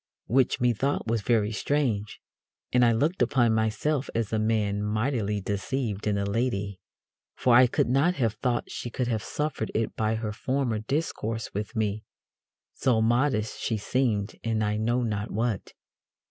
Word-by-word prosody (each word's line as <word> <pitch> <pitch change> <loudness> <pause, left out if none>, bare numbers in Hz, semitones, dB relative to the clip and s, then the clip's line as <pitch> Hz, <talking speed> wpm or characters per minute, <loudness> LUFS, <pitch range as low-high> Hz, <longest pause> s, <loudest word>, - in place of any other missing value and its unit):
Which 130 +1 +2
methought 125 +4 +1
was 115 -1 0
very 110 0 +2
strange, 115 -4 -1 0.5
and 125 0 +5
I 120 - +5
looked 145 +10 +1
upon 120 -2 +3
myself 120 +6 0
as 115 -2 -1
a 110 - +2
man 105 -2 +1
mightily 105 0 0
deceived 105 +2 -2
in 105 -1 +1
a 100 - 0
lady, 100 -3 -1 0.6
for 125 -2 +3
I 125 +1 +8
could - - +1
not 140 +8 +3
have 115 -7 +1
thought 120 +2 -2
she 120 - -5
could 125 +1 -2
have 110 -3 0
suffered 150 -2 -3
it 110 0 -1
by 110 0 0
her 110 -1 -3
former 125 0 -1
discourse 115 -3 -3
with 105 +4 -4
me; 110 -1 -1 0.7
so 125 -4 +2
modest 115 0 +1
she 110 - 0
seemed 105 -2 0
and 110 -1 0
I 105 0 0
know 120 +3 +1
not 105 -2 -2
what. 110 -2 -2
115 Hz, 160 wpm, -27 LUFS, 105-125 Hz, 0.7 s, I